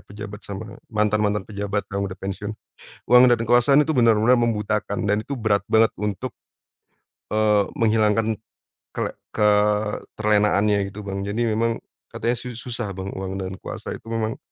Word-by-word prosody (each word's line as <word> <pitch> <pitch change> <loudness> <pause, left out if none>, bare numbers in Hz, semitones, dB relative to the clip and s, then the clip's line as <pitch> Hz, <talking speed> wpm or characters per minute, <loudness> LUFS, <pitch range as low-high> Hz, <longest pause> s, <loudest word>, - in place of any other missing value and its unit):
pejabat 105 0 -9
sama 100 +2 -7 0.2
mantan-mantan 105 -1 +1
pejabat 100 0 -2
yang 100 0 -1
udah 95 -1 -5
pensiun. 100 +2 -4 0.5
Uang 125 +1 +7
dan 120 - +4
kekuasaan 120 +5 +5
itu 160 - 0
benar-benar 115 0 +5
membutakan, 105 -2 -1
dan 105 +1 +1
itu 140 - -5
berat 105 -2 +1
banget 110 0 +5
untuk, 105 +4 -3 1.0
eee, 105 -2 +3
menghilangkan 110 -2 +2 0.6
kele - - -2 0.2
keterlenaannya 105 -1 +2
gitu 105 - -7
Bang. 100 0 -3
Jadi 105 +4 -2
memang 115 +1 0 0.3
katanya 120 +1 -1
su-susah 120 -2 -5
Bang 95 +1 -4
uang 95 0 -4
dan 95 0 -5
kuasa - - -6
itu - - -20
memang, 115 -1 -2
105 Hz, 140 wpm, -23 LUFS, 100-115 Hz, 1.0 s, Uang